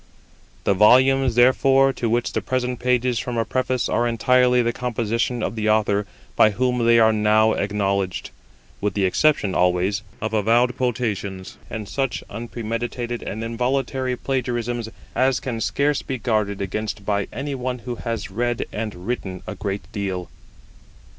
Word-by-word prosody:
The 100 Hz, -, +3 dB
volumes, 130 Hz, +5 st, +5 dB
therefore, 135 Hz, +2 st, +5 dB
to 120 Hz, -, -2 dB
which 120 Hz, +1 st, 0 dB
the -, -, 0 dB
present 125 Hz, -1 st, -2 dB
pages 125 Hz, -1 st, +1 dB
form 125 Hz, 0 st, -3 dB
a 115 Hz, -, +1 dB
Preface 130 Hz, +2 st, 0 dB
are 120 Hz, -, +1 dB
entirely 125 Hz, +2 st, +3 dB
the 120 Hz, 0 st, 0 dB
composition 120 Hz, 0 st, -1 dB
of -, -, -2 dB
the 110 Hz, -1 st, 0 dB
Author 105 Hz, -1 st, +2 dB, 0.3 s
by 110 Hz, -, +6 dB
whom 125 Hz, +3 st, 0 dB
they 115 Hz, 0 st, +6 dB
are 110 Hz, -1 st, +5 dB
now 110 Hz, +1 st, +3 dB
acknowledged, 100 Hz, -2 st, -1 dB, 0.5 s
with 105 Hz, -1 st, -1 dB
the 100 Hz, -2 st, +2 dB
exception, 105 Hz, 0 st, +2 dB
always, 90 Hz, +3 st, +1 dB, 0.2 s
of 110 Hz, +1 st, -3 dB
avowed 115 Hz, +3 st, +3 dB
quotations, 105 Hz, -7 st, -3 dB
and 110 Hz, -2 st, -5 dB
such 135 Hz, +1 st, -2 dB
unpremeditated 120 Hz, +1 st, -4 dB
and 110 Hz, +3 st, -5 dB
involuntary 125 Hz, +2 st, -1 dB
plagiarisms 120 Hz, -3 st, -2 dB, 0.2 s
as 130 Hz, 0 st, +2 dB
can 115 Hz, -4 st, -4 dB
scarce 140 Hz, +5 st, +1 dB
be 130 Hz, -, -4 dB
guarded 105 Hz, -4 st, -1 dB
against 105 Hz, +1 st, -4 dB
by 100 Hz, -1 st, 0 dB
any 140 Hz, +4 st, -4 dB
one 125 Hz, -1 st, -3 dB
who 120 Hz, -2 st, -4 dB
has 115 Hz, -5 st, -4 dB
read 120 Hz, +3 st, -1 dB
and 105 Hz, -5 st, -5 dB
written 100 Hz, -6 st, -4 dB
a -, -, -5 dB
great 100 Hz, 0 st, -4 dB
deal. 95 Hz, -3 st, -3 dB
115 Hz, 155 wpm, -22 LUFS, 105-125 Hz, 0.5 s, by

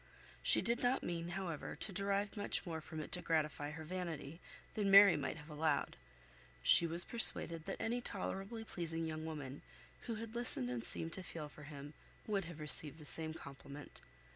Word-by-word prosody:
She -, -, +2 dB
did 235 Hz, +1 st, -2 dB
not 250 Hz, +2 st, -1 dB
mean, 170 Hz, -1 st, -5 dB
however, 170 Hz, -6 st, -6 dB
to -, -, -1 dB
derive 200 Hz, +2 st, -3 dB
much 205 Hz, -1 st, -3 dB
more 165 Hz, -2 st, -6 dB
from 155 Hz, 0 st, -8 dB
it -, -, -10 dB
to 180 Hz, -, +3 dB
gratify 150 Hz, -4 st, -2 dB
her 155 Hz, +1 st, -9 dB
vanity, 165 Hz, -2 st, -7 dB, 0.3 s
than 205 Hz, -3 st, -2 dB
Mary 200 Hz, -2 st, +7 dB
might 145 Hz, +1 st, -5 dB
have 150 Hz, 0 st, -13 dB
allowed. 150 Hz, -1 st, -2 dB, 0.7 s
She 170 Hz, -, +4 dB
was 170 Hz, +2 st, -2 dB
persuaded 170 Hz, -8 st, +4 dB
that -, -, -5 dB
any 240 Hz, +2 st, -3 dB
tolerably 200 Hz, +1 st, -6 dB
pleasing 165 Hz, -5 st, -5 dB
young 155 Hz, 0 st, -6 dB
woman 145 Hz, -4 st, -8 dB, 0.5 s
who 230 Hz, -, -4 dB
had 225 Hz, 0 st, -9 dB
listened 235 Hz, -, +8 dB
and 120 Hz, -2 st, -5 dB
seemed 165 Hz, +6 st, -3 dB
to 190 Hz, -, -4 dB
feel 160 Hz, -4 st, -9 dB
for 145 Hz, 0 st, -15 dB
him 145 Hz, 0 st, -11 dB, 0.3 s
would 200 Hz, -4 st, -3 dB
have 165 Hz, -2 st, -11 dB
received 150 Hz, 0 st, +7 dB
the 155 Hz, -, -13 dB
same 160 Hz, +4 st, -2 dB
compliment. 140 Hz, 0 st, -12 dB
165 Hz, 185 wpm, -35 LUFS, 150-195 Hz, 0.7 s, listened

